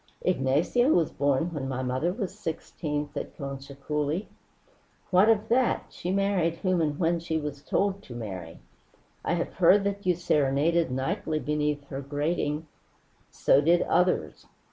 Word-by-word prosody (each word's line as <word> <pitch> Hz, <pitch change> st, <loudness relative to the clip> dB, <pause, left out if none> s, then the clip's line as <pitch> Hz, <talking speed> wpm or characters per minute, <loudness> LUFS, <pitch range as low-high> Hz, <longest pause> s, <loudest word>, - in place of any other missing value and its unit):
"Ignacio 175 Hz, -, +2 dB
was 170 Hz, -, +3 dB
born 145 Hz, +4 st, 0 dB
when 135 Hz, -4 st, -3 dB
my 130 Hz, -1 st, -3 dB
mother 130 Hz, +7 st, 0 dB
was 195 Hz, -1 st, -4 dB
sixteen," 150 Hz, -2 st, -4 dB
said -, -, -6 dB
Concha 140 Hz, 0 st, -7 dB
coolly. 150 Hz, +6 st, -2 dB, 0.8 s
"What 190 Hz, +4 st, +5 dB
of 220 Hz, -1 st, +3 dB
that? 250 Hz, +1 st, +2 dB
She 175 Hz, -, -5 dB
married 190 Hz, -4 st, +1 dB
whom 185 Hz, -1 st, 0 dB
and 150 Hz, -2 st, 0 dB
when 170 Hz, 0 st, +1 dB
she 160 Hz, -1 st, -2 dB
was 150 Hz, -2 st, -4 dB
told 200 Hz, +5 st, 0 dB
to 120 Hz, -, -10 dB
marry." 95 Hz, -8 st, -6 dB, 0.7 s
"I -, -, 0 dB
have 170 Hz, -, -3 dB
heard 190 Hz, +3 st, +5 dB
that 200 Hz, 0 st, -2 dB
you 180 Hz, -, +4 dB
serenaded 155 Hz, 0 st, +2 dB
nightly 155 Hz, +5 st, -1 dB
beneath 150 Hz, 0 st, -1 dB
her 135 Hz, 0 st, -4 dB
grating 150 Hz, +2 st, -1 dB, 0.3 s
" -, -, -37 dB, 0.2 s
"So 140 Hz, -, +6 dB
did 170 Hz, +3 st, +4 dB
others." 180 Hz, -, 0 dB
160 Hz, 155 wpm, -27 LUFS, 140-180 Hz, 0.8 s, So